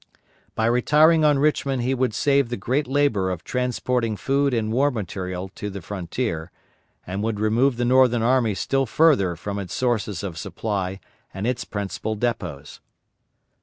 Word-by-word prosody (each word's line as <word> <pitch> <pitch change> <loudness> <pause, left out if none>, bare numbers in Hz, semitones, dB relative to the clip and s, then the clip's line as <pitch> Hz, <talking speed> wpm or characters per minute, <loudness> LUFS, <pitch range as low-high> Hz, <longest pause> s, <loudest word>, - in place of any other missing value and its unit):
By 110 - +1
retiring 150 +7 +4
on 150 -2 +4
Richmond 135 -3 +1
he 130 +2 +1
would 130 -4 0
save 140 -2 +2
the 120 - -3
great 130 +8 -1
labor 130 -9 +1
of 90 -2 -4
transporting 125 -3 -1
food 140 +8 +1
and 110 -3 -1
war 140 +4 +3
material 95 -5 -5
to 105 - -6
the 100 0 -6
frontier, 90 -1 -4 0.6
and 95 +3 -4
would 110 -1 -2
remove 115 +4 +2
the 120 - 0
Northern 125 -2 +4
army 120 -4 +2
still 135 +5 0
further 120 - +3
from 100 +4 -5
its 90 -3 -5
sources 110 -7 -1
of 85 -5 -5
supply 95 -1 -3 0.4
and 95 +2 -3
its 125 0 -1
principal 100 +2 -4
depots. 100 - -4
115 Hz, 160 wpm, -23 LUFS, 100-130 Hz, 0.6 s, retiring